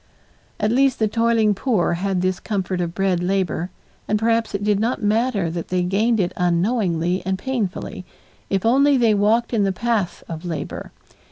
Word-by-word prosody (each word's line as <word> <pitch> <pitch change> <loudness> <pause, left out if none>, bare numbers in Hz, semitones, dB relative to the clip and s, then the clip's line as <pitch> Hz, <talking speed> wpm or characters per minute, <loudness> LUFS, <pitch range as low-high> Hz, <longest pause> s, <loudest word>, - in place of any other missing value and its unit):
At 210 +1 +1
least 270 +1 +3
the 220 - +1
toiling 230 -1 +2
poor 200 -5 0
had 185 +1 -1
this 185 -1 0
comfort 190 -4 -2
of 170 0 -3
bread 190 -3 +1
labor, 185 -2 -1 0.4
and 210 - +1
perhaps 225 0 0
it 200 - -3
did 205 -1 +2
not 230 +1 -1
matter 210 -4 +1
that 170 0 -5
they 180 -1 0
gained 215 +5 +1
it 180 -2 0
unknowingly 180 -1 0
and 190 +1 -1
painfully, 205 -4 -3 0.5
if 195 +1 -1
only 275 +4 +4
they 230 -3 +3
walked 220 +4 +2
in 220 - +2
the 195 -1 +2
path 210 -2 -1
of 165 0 -7
labor. 165 -4 -5
200 Hz, 175 wpm, -21 LUFS, 180-230 Hz, 0.5 s, only